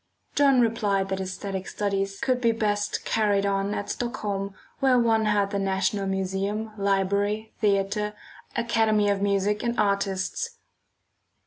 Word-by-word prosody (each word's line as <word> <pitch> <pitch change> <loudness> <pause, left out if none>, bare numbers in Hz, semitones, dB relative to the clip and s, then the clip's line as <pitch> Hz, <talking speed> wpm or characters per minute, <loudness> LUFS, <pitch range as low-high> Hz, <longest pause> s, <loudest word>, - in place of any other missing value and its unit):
John 275 -3 +5
replied 205 -4 +1
that 190 0 -2
æsthetic 190 0 -4
studies 195 -1 -2
could 255 -2 0
be 230 -2 +4
best 205 -2 -1
carried 205 -2 +2
on 200 +1 0
at 205 - -3
Stockholm 200 -5 -3 0.2
where 265 -2 +4
one 225 -2 +3
had 205 -1 +2
the 200 - -1
National 195 +1 0
Museum, 195 +3 -2
Library, 200 +2 0
Theatre, 210 0 +1 0.4
Academy 225 -3 +2
of 200 -1 -1
Music 200 +1 +1
and 235 0 -1
Artists. 200 - 0
205 Hz, 130 wpm, -26 LUFS, 195-220 Hz, 0.4 s, John